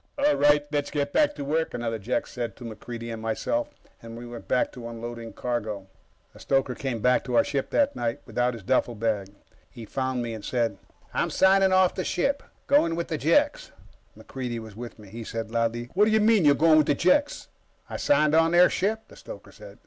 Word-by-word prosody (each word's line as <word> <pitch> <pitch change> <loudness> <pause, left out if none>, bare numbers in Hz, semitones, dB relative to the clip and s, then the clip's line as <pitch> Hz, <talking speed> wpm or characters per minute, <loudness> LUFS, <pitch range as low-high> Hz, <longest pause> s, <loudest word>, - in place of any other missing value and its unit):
"All 290 +1 +3
right, 145 0 +4
let's 145 -1 -1
get 145 -1 -2
back 300 - +3
to 145 - -5
work," 160 +3 -1
another 115 -1 -3
Jek 110 +5 -1
said 120 -4 -5
to - - -12
MacReidie 115 +1 -7
and 110 - -7
myself, 200 - -1 0.3
and 115 0 -9
we 120 - -8
went 120 0 -9
back 125 - +1
to 120 -2 -8
unloading 115 0 -7
cargo. 110 -5 -3 0.5
The - - -16
stoker 135 -2 0
came 125 -4 -4
back 125 +2 +3
to 125 - -2
our - - +6
ship 140 -2 -2
that 285 -1 +2
night, 115 -1 -2
without 125 0 -1
his 110 - -10
duffelbag. 110 -3 0 0.4
He 115 - -10
found 130 +1 -2
me 115 -1 -4
and 110 -2 -8
said: 115 -5 -1 0.3
"I'm - - 0
signing 190 0 +4
off 185 -1 +4
the 185 - -3
ship. 275 +13 0 0.2
Going 225 - +3
with 170 +1 -3
the 160 - -1
Jeks." 290 - +2 0.5
MacReidie 125 -3 -5
was 110 -3 -9
with 120 +1 -8
me. 105 -2 -14
He 115 +3 -7
said 115 0 -5
loudly: 115 +1 -1
"What 205 +3 +4
do 220 - +1
you 220 - +4
mean, 215 -4 +4
you're 145 -1 +6
going 155 +1 +5
with 150 - +2
the 145 - +3
Jeks?" 285 - +1 0.4
"I - - -5
signed 155 - +3
on 165 +1 +4
their 175 +1 +6
ship," 220 +3 -1
the - - -16
stoker - - -11
said. - - -13
125 Hz, 215 wpm, -26 LUFS, 115-170 Hz, 0.5 s, our